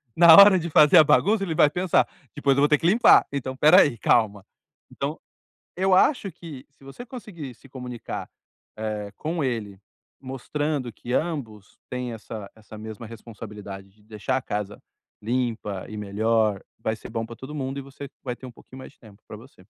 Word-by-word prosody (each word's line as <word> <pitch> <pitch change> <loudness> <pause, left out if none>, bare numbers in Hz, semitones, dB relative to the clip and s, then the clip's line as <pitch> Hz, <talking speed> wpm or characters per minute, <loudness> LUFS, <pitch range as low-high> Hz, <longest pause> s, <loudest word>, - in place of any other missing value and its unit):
Na 170 -1 +8
hora 200 -1 +9
de 170 -1 -3
fazer 150 +4 +6
a 155 - +9
bagunça, 195 +8 +3
ele 165 -4 -2
vai 150 - +4
pensar: 180 +2 +1 0.3
"Depois 140 -2 +1
eu - - +3
vou 145 - +5
ter 150 -1 +3
que 165 - 0
limpar. 225 +6 +6
Então, 130 -2 -4
espera 155 +8 +6
aí, 145 -6 +2
calma". 105 -3 +1 0.5
Então, - - -4 0.6
eu 190 0 +2
acho 205 -1 +3
que 155 -8 -11
se 140 - -23
você 240 - -10
conseguir 175 - -9
se 135 - -19
comunicar, 125 -2 -7 0.5
eh, 105 -2 -4
com 160 0 -3
ele, 105 -7 -3 0.4
mostrando 135 0 -3
que 120 +3 -8
ambos 125 - -4
têm 125 -1 -4
essa 110 -2 -8
essa 110 0 -14
mesma 110 +1 -8
responsabilidade 105 -3 -10
de 105 +1 -28
deixar 110 +4 -3
a 130 - -2
casa 105 0 -4 0.4
limpa 115 -5 -3
e 110 - -8
melhor, 105 0 0 0.2
vai 110 0 -2
ser 110 - -11
bom 115 0 -3
para 115 - -9
todo 135 +6 -9
mundo, 135 -1 -4
e - - -5
você 140 +1 -10
vai 125 -2 -4
ter 130 - -16
um 125 - -10
pouquinho 130 - -16
mais - - -11
de - - -32
tempo 105 -2 -18
para - - -10
você. 115 -6 -18
125 Hz, 190 wpm, -24 LUFS, 110-150 Hz, 0.6 s, hora